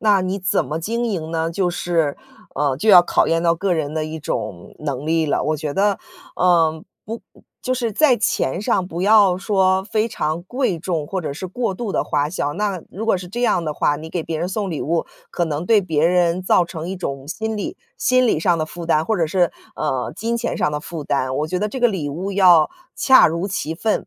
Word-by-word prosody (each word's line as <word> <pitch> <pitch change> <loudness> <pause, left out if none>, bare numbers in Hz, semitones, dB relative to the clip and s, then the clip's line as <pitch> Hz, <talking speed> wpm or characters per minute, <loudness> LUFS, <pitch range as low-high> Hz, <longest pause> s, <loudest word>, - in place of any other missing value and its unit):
那 205 -3 +3
你 185 +2 -2
怎 180 -1 +1
么 155 - -3
经 230 +7 -2
营 165 -7 -3
呢？ 165 0 -1
就 180 +1 0
是 170 -4 0 0.4
呃， 140 -1 +1
就 220 - -1
要 185 -4 +9
考 - - +2
验 165 +1 +1
到 170 -1 +3
个 185 +1 0
人 150 -2 -2
的 155 -1 -2
一 160 +1 -6
种 90 - -5
能 145 -1 -4
力 160 0 +1
了。 145 - 0
我 155 - 0
觉 150 -1 -4
得， 200 +1 +2 0.4
呃， 165 -3 +3 0.2
不 225 +2 -6 0.4
就 255 -1 -1
是 235 -3 -2
在 275 0 +4
钱 185 -3 0
上 190 -3 0
不 170 +1 -4
要 200 -3 +5
说 190 -1 +2
非 220 +1 0
常 155 -4 -2
贵 245 -3 -1
重 160 -3 -2
或 190 +3 -3
者 155 -4 -4
是 185 - -5
过 195 +1 -2
度 220 -1 -4
的 - - +1
花 145 +1 -1
销， 145 -5 -2
那 200 -3 -2
如 215 +5 -5
果 225 - +3
是 180 - -8
这 240 +6 -4
样 180 -7 +2
的 155 -2 -3
话， 145 - +1
你 155 +2 -8
给 165 0 -3
别 160 0 -4
人 175 +3 -2
送 200 0 -2
礼 155 - -3
物， 165 +2 0 0.3
可 175 - 0
能 160 +1 -3
对 215 -3 +4
别 160 -3 +1
人 175 0 +2
造 180 -1 +3
成 165 0 -7
一 190 - -4
种 140 -6 -5
心 220 +5 -3
理 205 - -4 0.2
心 255 0 +3
理 185 - +1
上 170 +1 +2
的 155 - -1
负 170 +1 -8
担， 155 -1 +2
或 220 - 0
者 165 - +2
是 175 +1 +2 0.2
呃 130 -5 -2
金 230 +2 -2
钱 235 - -2
上 150 - 0
的 150 - -2
负 155 -2 -7
担。 130 -2 -1
我 150 - -1
觉 180 +3 -2
得 210 +3 -1
这 260 - -5
个 245 -1 +4
礼 180 -9 -3
物 180 +8 -4
要 180 -5 +5 0.2
恰 265 -1 +6
如 170 +5 -2
其 165 -4 -3
分， 215 +5 -1
175 Hz, 255 characters per minute, -20 LUFS, 155-200 Hz, 0.4 s, 要